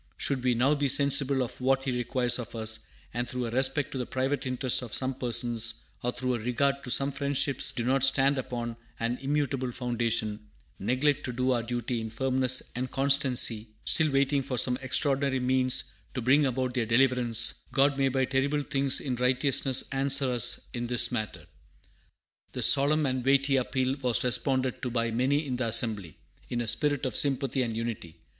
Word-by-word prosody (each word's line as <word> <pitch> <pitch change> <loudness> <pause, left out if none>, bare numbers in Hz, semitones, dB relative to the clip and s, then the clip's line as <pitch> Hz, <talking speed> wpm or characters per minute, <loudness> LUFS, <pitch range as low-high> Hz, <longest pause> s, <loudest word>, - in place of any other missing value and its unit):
Should 135 -3 -1
we 125 -1 +2
now 130 +5 +3
be 145 -2 0
sensible 140 -1 +3
of 125 - -8
what 135 +1 +2
He 135 - -1
requires 125 0 -1
of 120 -1 -7
us, 110 0 0 0.3
and 120 +1 -3
through 125 0 -3
a 115 - -4
respect 135 +3 0
to 135 - -4
the 125 - -3
private 135 +1 -2
interest 130 0 0
of 120 -3 -4
some 130 0 0
persons, 120 -2 -1 0.3
or 125 - -1
through 125 +1 -2
a 120 - -2
regard 140 +4 0
to 125 - -7
some 140 +3 +1
friendships 140 0 0
which - - -8
do 120 - -2
not 135 +2 +2
stand 135 0 +4
upon 120 -2 -5 0.2
an 115 +2 -2
immutable 135 -2 -1
foundation, 115 -3 -1 0.4
neglect 130 +7 +1
to 130 - -3
do 125 +2 0
our 120 -2 +1
duty 120 0 -3
in 110 - -5
firmness 130 +2 +1
and 130 +1 -3
constancy, 135 -5 +1 0.2
still 155 -1 +2
waiting 140 +1 +2
for 130 -1 -4
some 125 +2 +1
extraordinary 135 0 0
means 130 0 +1 0.3
to 125 - -2
bring 140 +4 +4
about 130 0 -2
their 120 -3 -1
deliverance, 120 -2 +2 0.2
God 140 +1 +3
may 135 0 +3
by 130 0 +1
terrible 140 +3 0
things 135 -1 0
in 130 -3 -3
righteousness 130 +1 +1
answer 135 -1 0
us 120 0 -1
in 120 -1 -3
this 120 +1 +3
matter." 110 -3 -4 1.1
This - - +3
solemn 145 +2 +7
and 130 -2 -1
weighty 135 +1 +3
appeal 130 +1 0
was 125 -5 +1
responded 130 +1 0
to 125 - -2
by 115 -1 -1
many 135 +6 +1
in 130 -3 -3
the 125 -2 -1
assembly, 110 -7 0 0.3
in 120 - -2
a 120 - -1
spirit 145 +3 +1
of 130 - -3
sympathy 135 -2 +1
and 115 -3 -2
unity. 110 -8 -5
130 Hz, 190 wpm, -28 LUFS, 120-135 Hz, 1.1 s, solemn